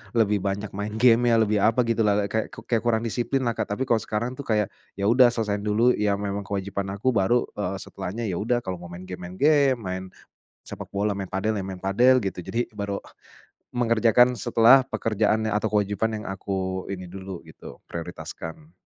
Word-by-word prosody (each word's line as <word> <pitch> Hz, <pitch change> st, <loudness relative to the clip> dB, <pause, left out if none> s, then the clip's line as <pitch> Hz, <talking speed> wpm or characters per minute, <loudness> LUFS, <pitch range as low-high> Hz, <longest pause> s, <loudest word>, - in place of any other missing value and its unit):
lebih 105 Hz, -3 st, +3 dB
banyak 100 Hz, +1 st, -3 dB
main 105 Hz, +2 st, -4 dB
gamenya, 120 Hz, 0 st, +5 dB
lebih 105 Hz, -1 st, +1 dB
apa 115 Hz, +5 st, +3 dB
gitulah, 105 Hz, -3 st, +1 dB
kayak 110 Hz, 0 st, -2 dB, 0.2 s
kayak 115 Hz, -2 st, +2 dB
kurang 115 Hz, -1 st, +2 dB
disiplinlah, 120 Hz, +2 st, 0 dB
Kak. 105 Hz, -, -2 dB
Tapi 130 Hz, -, -1 dB
kalau 115 Hz, -2 st, +4 dB
sekarang 115 Hz, +4 st, -3 dB
tuh, 140 Hz, -, -7 dB
kayak 105 Hz, -3 st, +1 dB, 0.2 s
ya 100 Hz, -, -2 dB
udah 125 Hz, +1 st, +7 dB
selesaiin 105 Hz, -3 st, -2 dB
dulu 110 Hz, +4 st, +3 dB
ya 105 Hz, -1 st, +1 dB
memang 100 Hz, 0 st, -3 dB
kewajiban 100 Hz, 0 st, -3 dB
aku 130 Hz, +6 st, +1 dB
baru, 120 Hz, +3 st, +2 dB
eee, 100 Hz, -2 st, -3 dB
setelahnya, 100 Hz, +4 st, -6 dB
ya 90 Hz, -, -2 dB
udah 120 Hz, +3 st, 0 dB
kalau 95 Hz, -2 st, -4 dB
mau 90 Hz, -, -9 dB
main 85 Hz, +1 st, -9 dB
game 90 Hz, -1 st, -7 dB
main 90 Hz, -, -10 dB
game, 140 Hz, 0 st, +4 dB
main 95 Hz, -1 st, -4 dB, 0.6 s
sepak -, -, -8 dB
bola, 100 Hz, 0 st, 0 dB
main 95 Hz, -2 st, -5 dB
padel, 105 Hz, +3 st, -1 dB
ya 95 Hz, -, -3 dB
main 95 Hz, -1 st, -7 dB
padel, 125 Hz, +6 st, +4 dB
gitu. 95 Hz, -2 st, -3 dB
Jadi 120 Hz, +1 st, -2 dB
baru 100 Hz, -1 st, -3 dB, 0.7 s
mengerjakan 120 Hz, +1 st, +4 dB
setelah 115 Hz, +4 st, +5 dB
pekerjaannya 110 Hz, -2 st, 0 dB
atau 105 Hz, +1 st, +1 dB
kewajiban 105 Hz, +1 st, 0 dB
yang -, -, -8 dB
aku 95 Hz, -1 st, -3 dB
ini 95 Hz, -2 st, -5 dB
dulu 95 Hz, 0 st, -8 dB
gitu -, -, -13 dB
prioritaskan. 80 Hz, -1 st, -8 dB
105 Hz, 185 wpm, -25 LUFS, 95-115 Hz, 0.7 s, udah